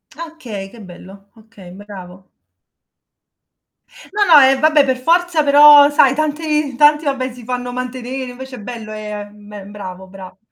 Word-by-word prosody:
Okay, 260 -13 -9
che 230 0 -15
bello. 195 +2 -15
Okay, 215 -5 -17
bravo. 190 -2 -13 1.8
No, 415 0 0
no. 330 -6 +7
Eh, 265 0 +3
vabbè 305 -2 +3
per 260 -1 -1
forza 335 +3 0
però 290 0 +6
sai 275 -2 +3
tanti 300 -2 -2
tanti 295 +3 +3
vabbè 260 -2 -3
si 245 -1 -14
fanno 245 0 -5
mantenere, 255 0 -6
invece 260 +1 -11
è - - -11
bello 220 -1 -9
è 210 -1 -8
è - - -19
me 210 -1 -13
bravo, 190 -2 -10
bravo. 185 -1 -13
250 Hz, 155 wpm, -16 LUFS, 205-290 Hz, 1.8 s, no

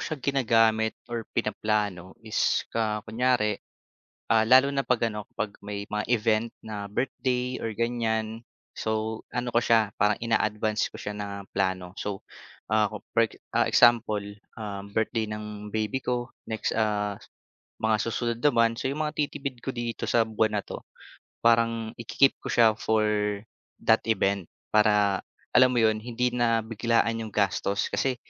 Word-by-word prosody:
siya 155 - -3
ginagamit 115 -5 +3 0.2
or 115 -2 -4
pinaplano 105 -4 -1
is 110 - +1
ka 110 -2 -1
kunyari, 110 -2 +1 0.7
ah, 110 - +5
lalo 130 +2 +7
na 135 - +1
'pag, 120 -2 +1
ano, 105 -1 -7
'pag 105 -1 -2
may 100 0 -4
mga 105 0 -2
event 115 -1 +2 0.2
na 105 -2 -5
birthday 125 +2 -1
or 115 - -2
ganyan, 115 -1 -1 0.4
so, 110 0 -2 0.2
ano 125 0 -2
ko 120 - +4
siya 110 -3 +3
parang 105 0 +4
ina-advance 110 -1 +1
ko - - -8
siya 105 - -4
ng 100 -1 -6
plano. 95 -2 -1
So, 100 -1 -4 0.5
ah, 110 -1 +4
for, 110 +2 0 0.3
ah, - - +4
example, 115 -3 +4 0.3
ah, 105 -3 -5
birthday 110 +1 -1
ng 105 0 -6
baby 110 +4 -1
ko 120 0 -2 0.2
next, 110 -1 -2
ah, 105 -2 0 0.7
mga 110 0 +3
susunod 115 0 -2
na 150 - +8
buwan, 115 0 +4
so - - -1
yung 150 +3 -1
matitipid 145 -4 -3
ko 135 - -2
dito 120 -1 -3
sa 115 -1 +4
buwan 110 -1 +1
na - - -16
'to - - -7 0.6
parang 115 -1 +3
iki-keep 135 +4 +2
ko - - -4
siya 115 -2 +6
for 110 0 +1 0.8
that - - +4
event 100 -4 +1 0.3
para, 105 -2 +4 0.3
alam 130 0 +6
mo 120 - +2
yun, 110 -1 +3
hindi 125 +2 -1
na 115 -2 +2
biglaan 115 +1 +1
yung 110 - -8
gastos. 100 0 0
Kasi 130 -1 0
110 Hz, 155 wpm, -27 LUFS, 105-120 Hz, 0.8 s, na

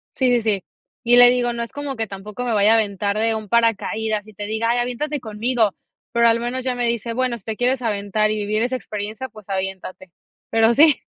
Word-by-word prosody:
Sí, 260 -2 +2
sí, 240 -1 +3
sí. 205 -4 0 0.4
Y 240 +1 +5
le 245 0 +9
digo, 245 -1 +1
no 235 0 -3
es 235 - -8
como 285 -2 -5
que 225 -1 -2
tampoco 205 +5 -7
me 235 - 0
vaya 210 +1 +4
a - - +5
aventar 205 -1 0
de 225 +1 +1
un 215 -2 -5
paracaídas, 220 -1 0
y 215 - -14
te 205 +1 -6
diga: 220 +2 -1
"Ay, 240 - +2
aviéntate 250 +5 -2
conmigo", 225 -1 0 0.4
pero, 235 0 +4
al 230 0 +3
menos 245 +2 -3
ya 255 -1 -1
me 245 -1 -1
dice: 235 0 -2
"Bueno, 250 -1 -1
si 195 - -22
te 220 -1 -3
quieres 255 +1 +1
aventar 215 -1 0
y 215 - 0
vivir 210 +1 -1
esa 250 +2 0
experiencia, 215 +1 -5
pues 210 -2 -15
aviéntate", 190 -1 -5 0.4
pero 225 +1 +4
sí. 300 +1 +6
225 Hz, 230 wpm, -21 LUFS, 210-245 Hz, 0.4 s, le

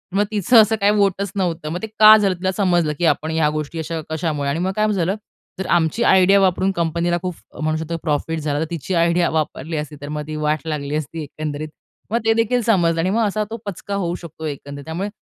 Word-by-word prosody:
मग 205 - +4
तिचं 220 +3 +5
असं 220 +1 +2
काही 205 -1 +3
व्होटच 200 -2 +1
नव्हतं. 170 -5 -2
मग 175 +3 -4
ते 220 - -4
का 215 0 +10
झालं 200 -3 +2
तिला 190 +1 -1
समजलं, 175 -5 +1
की 175 - +1
आपण 160 -1 +1
ह्या 160 -2 +2
गोष्टी 155 +1 -4
अशा 160 +1 -3
कशामुळे 155 -3 -2
आणि 155 - -1
मग 185 +2 0
काय 215 0 +2
झालं. 190 0 0 0.4
जर 190 - -2
आमची 175 +7 +2
आयडिया 190 -1 +5
वापरून 190 0 +2
कंपनीला 170 0 0
खूप 180 -1 -4 0.3
म्हणू 155 0 0
शकतो 160 +1 -4
प्रॉफिट 160 +2 -1
झाला. 145 -1 -1
तर 160 - 0
तिची 170 +2 -4
आयडिया 170 +1 +2
वापरली 155 0 -2
असती, 150 0 -5
तर 145 - -7
मग 150 0 -3
ती 155 - -5
वाट 150 0 0
लागली 150 -2 -3
असती 155 +1 -4
एकंदरीत. 150 +1 -5 0.4
मग 230 - +2
ते 225 - +4
देखील 230 +2 +1
समजलं 170 -7 +2
आणि 180 - +1
मग 225 +4 +1
असा 215 +1 -1
तो 230 - -5
पचका 200 0 -5
होऊ 175 -3 -1
शकतो 160 -1 -9
एकंदरीत. 140 -1 -6
त्यामुळे 175 +6 -3
170 Hz, 225 wpm, -20 LUFS, 155-195 Hz, 0.4 s, का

